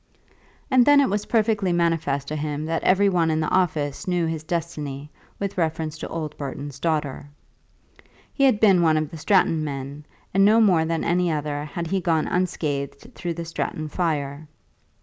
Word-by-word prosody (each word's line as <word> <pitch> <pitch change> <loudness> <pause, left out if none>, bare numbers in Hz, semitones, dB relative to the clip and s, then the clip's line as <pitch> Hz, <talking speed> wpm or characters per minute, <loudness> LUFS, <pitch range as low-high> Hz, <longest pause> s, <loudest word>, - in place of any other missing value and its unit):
And 255 -1 +6
then 290 +2 +6
it 275 - +3
was 205 +1 -2
painfully 215 -4 +1
manifest 165 -5 0
to 155 - -3
him 150 0 -3
that 165 +1 -1
every 195 +2 +4
one 175 -4 +2
in 155 0 +1
the 155 - 0
office 155 -2 0
knew 175 -2 +1
his 160 -1 -3
destiny 150 -4 -4 0.3
with 200 -2 -3
reference 160 -1 -1
to - - -5
old 155 -2 -5
Burton's 140 0 -6
daughter. 150 -3 -2 1.0
He 275 - +3
had 250 -6 +3
been 195 -5 +5
one 160 -2 +3
of 155 -1 -2
the 165 - -7
Stratton 165 -1 +2
men, 140 0 -6 0.3
and 195 +1 +4
no 215 +3 +6
more 180 -7 +4
than 165 0 -1
any 175 0 +1
other 150 -1 -2
had 170 +2 -5
he 190 +3 -1
gone 165 -3 +1
unscathed 145 -6 -2
through 175 -2 -4
the 170 0 -5
Stratton 155 -1 -4
fire. 150 -3 -2
160 Hz, 180 wpm, -24 LUFS, 150-180 Hz, 1.0 s, And